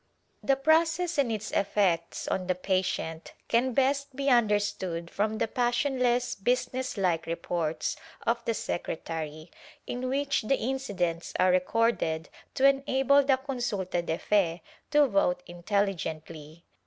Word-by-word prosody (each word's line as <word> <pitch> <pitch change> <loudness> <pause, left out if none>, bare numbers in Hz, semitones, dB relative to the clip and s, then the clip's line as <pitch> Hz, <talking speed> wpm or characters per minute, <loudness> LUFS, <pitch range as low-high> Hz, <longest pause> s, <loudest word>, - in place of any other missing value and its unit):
The 275 - +3
process 320 +3 +2
and 260 -5 +2
its 220 -1 -3
effects 190 -4 0
on 185 -1 -1
the 185 - +1
patient 180 -3 -2
can 245 +3 +2
best 275 +1 +1
be 275 0 +1
under 220 -4 +5
stood 175 -5 -4
from 215 +2 -1
the - - 0
passionless 245 +1 +1
business 250 +3 -1
like 175 -4 0
reports 165 - -2 0.3
of 235 +1 +1
the 230 - 0
secretary, 160 -3 -4 0.3
in 250 +1 -3
which 275 +1 0
the 260 +5 +1
incidents 200 -10 -2
are 185 0 +4
recorded 180 -4 +1 0.3
to 270 - +5
enable 275 0 +3
the 270 -1 +3
consulta 240 -10 -2
de 160 -1 -2
fe 175 -5 +1 0.3
to 295 -1 +5
vote 180 -5 +1
intelligently. 170 -4 -3
210 Hz, 130 wpm, -28 LUFS, 175-260 Hz, 0.3 s, under